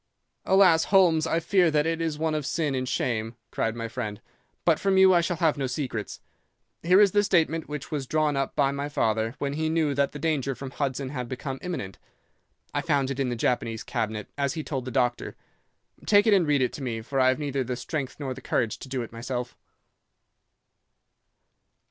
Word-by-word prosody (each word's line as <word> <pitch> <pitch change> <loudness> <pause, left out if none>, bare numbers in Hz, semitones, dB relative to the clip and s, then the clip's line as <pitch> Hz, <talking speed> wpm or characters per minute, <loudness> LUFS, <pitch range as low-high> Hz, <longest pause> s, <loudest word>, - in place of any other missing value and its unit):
"'Alas, 185 -4 +5
Holmes, 170 -5 +4
I 165 - +1
fear 175 +1 +3
that 150 -1 +2
it 165 0 -1
is 160 -2 -1
one 160 0 0
of 155 -1 -1
sin 145 +2 -1
and 130 -1 -2
shame!' 115 -1 -1 0.2
cried 115 0 -1
my 115 -1 -4
friend. 110 -3 -5 0.5
'But - - +4
from 195 -1 +2
you 190 0 +7
I 175 - +5
shall 170 0 -2
have 160 -3 +1
no 135 - 0
secrets. 125 -5 -4 0.6
Here 180 +3 +5
is 205 -2 +6
the 205 +1 +3
statement 165 -5 +1
which 150 -2 -6
was 140 -4 -3
drawn 155 -1 +1
up 135 0 -2
by 135 - +3
my 140 +1 -3
father 110 -3 0
when 140 -1 -2
he 155 +1 -1
knew 160 -3 +1
that 140 0 +1
the - - -7
danger 145 -3 -1
from 130 +2 -7
Hudson 135 -1 -2
had 125 -3 -5
become 130 +1 -5
imminent. 165 - -5 0.7
I 145 - 0
found 145 -4 +1
it 135 - -4
in 135 -2 0
the 120 - -2
Japanese 115 -1 -1
cabinet, 110 -1 -3
as 140 +2 0
he 155 - -3
told 135 -5 -4
the - - -4
doctor. 125 -1 -1 0.7
Take 205 -1 +5
it 220 - +5
and 185 -5 +3
read 145 -3 +3
it 125 - -1
to - - -7
me, 115 -4 -3
for 135 +4 -3
I 130 - +5
have 130 - +3
neither 140 -3 -2
the 125 0 -3
strength 140 +1 -4
nor 135 -3 -3
the 130 - -11
courage 115 -3 -1
to 130 - -10
do 130 -2 -2
it 115 - -9
myself. 120 +2 -5
140 Hz, 210 wpm, -26 LUFS, 125-160 Hz, 0.7 s, you